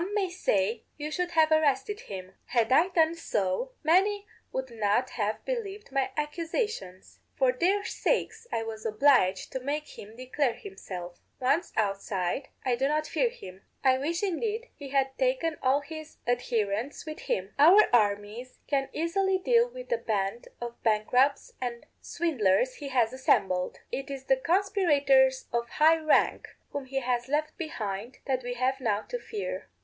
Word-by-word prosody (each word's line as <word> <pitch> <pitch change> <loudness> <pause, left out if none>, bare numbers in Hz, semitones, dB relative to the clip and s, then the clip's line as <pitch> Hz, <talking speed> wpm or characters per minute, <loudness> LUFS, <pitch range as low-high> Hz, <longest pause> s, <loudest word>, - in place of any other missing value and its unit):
_Some 390 +4 -3
may 385 -3 0
say, 220 - 0 0.2
'You 300 0 -4
should 360 +2 -1
have 320 -1 +4
arrested 310 +5 +2
him.' 190 -1 -8
Had 235 -1 +1
I 320 +7 +6
done 330 -3 +3
so, 220 - -2
many 395 +6 +3 0.3
would 260 -1 -4
not 225 +3 +1
have 215 -1 -2
believed 420 - -4
my 270 -1 +1
accusations. 300 - -3 0.2
For 260 -2 +3
their 380 +10 +1
sakes - - -1
I 225 - -1
was 220 -1 -6
obliged 220 -4 +3
to 260 - -3
make 290 +3 -4
him 215 +2 -11
declare 255 0 -1
himself. 180 - -8 0.2
Once 280 +7 +1
outside, 195 +1 -1 0.2
I 250 -2 +2
do 265 +3 +1
not 305 +1 0
fear - - +1
him; 190 - -11 0.2
I 260 -1 +4
wish 335 +7 -2
indeed 440 +5 -2
he 280 -2 -9
had 270 -1 +1
taken - - +1
all 270 +2 +3
his 315 +1 -9
adherents 235 0 -1
with 310 -1 -6
him. 190 +2 -3
Our 360 +9 +8
armies 210 +2 +1
can 275 -2 0
easily 380 +4 +1
deal 470 +5 +3
with - - -10
the 480 -2 +1
band 205 +1 -2
of 240 0 -7
bankrupts 245 +6 +2
and 240 -2 -4 0.2
swindlers 255 - +1
he 285 - -6
has 250 -3 +1
assembled; 190 -8 +1
it 275 +1 -4
is 275 -1 -6
the 265 0 +3
conspirators 285 -6 +3
of 235 0 -1
high 320 +4 +4
rank, 310 -1 +2 0.2
whom 285 -2 -4
he 270 +1 -2
has 245 -1 -1
left 305 +2 -1
behind, 230 - -4
that 260 -2 0
we 245 0 -4
have 260 +2 0
now 215 -4 +1
to - - -5
fear. 430 -3 -5
270 Hz, 165 wpm, -28 LUFS, 230-330 Hz, 0.3 s, Our